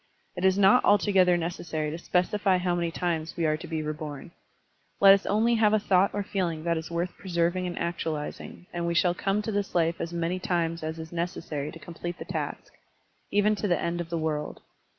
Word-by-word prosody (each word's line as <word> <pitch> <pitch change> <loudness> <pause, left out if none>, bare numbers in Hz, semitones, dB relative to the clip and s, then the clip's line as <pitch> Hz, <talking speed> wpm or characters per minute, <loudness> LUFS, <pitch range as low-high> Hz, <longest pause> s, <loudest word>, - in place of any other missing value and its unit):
It 180 - -5
is 190 0 +4
not 200 +5 +6
altogether 190 -3 +4
necessary 165 -3 -3
to 160 - -4
specify 185 +2 +1
how 180 0 0
many 170 -1 0
times 165 -2 -2
we 170 - +1
are 155 0 +2
to 170 +3 -8
be 160 -2 -3
reborn. 150 0 -6 0.7
Let 195 -1 +9
us 195 - 0
only 220 +3 +3
have 220 -2 +3
a 215 - +4
thought 195 -1 +3
or 205 - -2
feeling 175 -5 -2
that 170 0 +1
is 160 0 -5
worth 170 +1 -2
preserv 170 -2 0
ing 180 0 -2
and 175 - -5
actualizing, 165 -1 -4
and 170 0 -2
we 170 - -1
shall 175 0 +3
come 195 +3 -1
to 220 - -3
this 200 -2 -2
life 165 -1 +1
as 165 - -3
many 170 +2 -1
times 170 -2 -1
as 160 +1 -4
is 160 0 -8
necessary 165 -4 -3
to - - -10
complete 175 +1 -7
the - - -7
task, - - -5 0.6
even 205 +1 +3
to 205 - -1
the 175 - +2
end 170 0 -2
of 170 - -7
the 170 - -2
world. 155 -2 -3
175 Hz, 215 wpm, -27 LUFS, 165-190 Hz, 0.7 s, Let